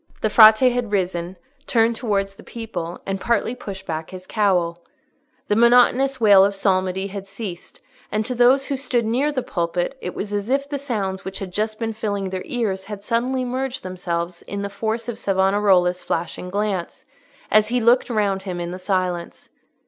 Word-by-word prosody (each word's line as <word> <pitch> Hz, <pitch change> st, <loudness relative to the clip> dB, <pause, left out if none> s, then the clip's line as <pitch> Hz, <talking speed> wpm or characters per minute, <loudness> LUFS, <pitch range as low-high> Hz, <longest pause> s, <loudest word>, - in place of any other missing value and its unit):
The 215 Hz, -, 0 dB
Frate 220 Hz, +3 st, +8 dB
had 245 Hz, -3 st, -2 dB
risen, 180 Hz, -2 st, -1 dB, 0.3 s
turned 230 Hz, -1 st, +3 dB
towards 200 Hz, -4 st, -1 dB
the -, -, -14 dB
people, 180 Hz, -7 st, -6 dB
and 195 Hz, 0 st, -3 dB
partly 235 Hz, 0 st, +1 dB
pushed 195 Hz, -5 st, -8 dB
back 160 Hz, -1 st, -4 dB
his 185 Hz, 0 st, -9 dB
cowl. 180 Hz, -5 st, 0 dB, 0.6 s
The 205 Hz, -, +2 dB
monotonous 245 Hz, +3 st, +4 dB
wail 205 Hz, -4 st, +7 dB
of 200 Hz, 0 st, +1 dB
psalmody 190 Hz, -1 st, 0 dB
had 195 Hz, 0 st, -6 dB
ceased, 195 Hz, -3 st, -8 dB, 0.3 s
and 215 Hz, +1 st, 0 dB
to 255 Hz, -, -2 dB
those 250 Hz, +3 st, +4 dB
who 280 Hz, -, -2 dB
stood 245 Hz, -3 st, 0 dB
near 260 Hz, +7 st, +1 dB
the 260 Hz, -4 st, -2 dB
pulpit, 175 Hz, +5 st, -2 dB
it -, -, -5 dB
was 205 Hz, 0 st, -4 dB
as 205 Hz, +2 st, -2 dB
if 275 Hz, +1 st, +1 dB
the 285 Hz, -1 st, -4 dB
sounds 200 Hz, -8 st, -3 dB
which 190 Hz, 0 st, -6 dB
had 185 Hz, -2 st, -6 dB
just 215 Hz, +2 st, -1 dB
been 225 Hz, -1 st, -3 dB
filling 205 Hz, -3 st, -3 dB
their 185 Hz, -1 st, -3 dB
ears 200 Hz, -6 st, -2 dB
had 205 Hz, -1 st, -7 dB
suddenly 250 Hz, +3 st, 0 dB
merged 260 Hz, +1 st, -3 dB
themselves 175 Hz, -1 st, -4 dB
in 200 Hz, 0 st, -5 dB
the 200 Hz, -, -3 dB
force 220 Hz, +3 st, -3 dB
of 240 Hz, -, -5 dB
Savonarola's 190 Hz, -2 st, +2 dB
flashing 170 Hz, +2 st, -3 dB
glance, 200 Hz, -2 st, -3 dB, 0.5 s
as 215 Hz, 0 st, +5 dB
he 245 Hz, +2 st, +1 dB
looked 240 Hz, +3 st, +3 dB
round 205 Hz, -4 st, 0 dB
him 185 Hz, -2 st, -5 dB
in 170 Hz, 0 st, -4 dB
the 185 Hz, -, -6 dB
silence. 185 Hz, -2 st, -3 dB
205 Hz, 185 wpm, -22 LUFS, 185-235 Hz, 0.6 s, Frate